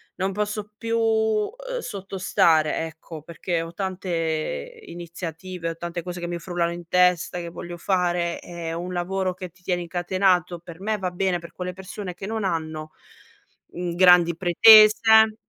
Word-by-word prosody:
non 190 +1 -1
posso 210 +1 -3
più, 230 0 -2
ehm, 225 - 0
sottostare, 185 - +1
ecco 160 -1 -10
perché 170 +1 -3
ho 165 +1 -7
tante 185 - -3
iniziative, 170 0 -6
ho - - -8
tante 170 +1 -5
cose 180 0 -6
che 175 - -3
mi 175 0 -3
frullano 170 -1 -2
in 170 -1 -8
testa, 180 -1 +2
che 170 -1 -6
voglio 175 +1 -8
fare 175 -1 0
e 170 -1 -7
un 175 +2 -5
lavoro 185 +1 -1
che 185 -1 -8
ti 180 +2 -28
tiene 180 -1 -1
incatenato 175 0 0
per 170 -1 -12
me 215 +2 -1
va 185 -1 -2
bene 180 0 0
per 170 0 -12
quelle 180 0 -5
persone 190 0 -7
che 195 - -8
non 220 0 -3
hanno, 155 -3 -3 0.8
mhmm, 175 -1 -4
grandi 175 -2 +6
pretese 215 +4 +7
180 Hz, 160 wpm, -24 LUFS, 170-195 Hz, 0.8 s, pretese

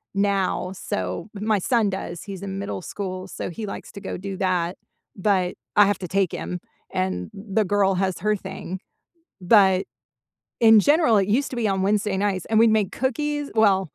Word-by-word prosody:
now, 195 -2 0
so 95 - -4
my 210 0 +1
son 225 0 +2
does, 185 -3 -5
he's 195 -2 -7
in 195 0 -4
middle 200 -2 -4
school, 185 0 -5
so - - -5
he 210 +5 -6
likes - - -7
to 200 - -9
go - - -5
do 195 +1 -5
that, 180 -2 0 0.4
but 190 -2 +1 0.2
I 205 - +8
have 205 -1 0
to 180 - -5
take 190 -4 +2
him, - - -5 0.5
and 95 -1 0 0.2
th 195 +3 -11
the 210 - +3
girl 195 -1 +3
has 185 -1 +1
her 210 0 +3
thing- 190 -1 -6 0.6
but, 190 -1 +5 0.8
in 220 -1 +9
general, 295 -8 +5
it 195 0 +1
used 285 - -3
to 255 - -5
be 220 - +1
on 190 0 -1
Wednesday 205 0 +1
nights, 195 -2 -1
and 220 - 0
we'd 230 -1 +6
make 200 -3 -2
cookies 290 +3 0 0.2
well, 195 -2 +5
195 Hz, 190 wpm, -24 LUFS, 185-210 Hz, 0.8 s, in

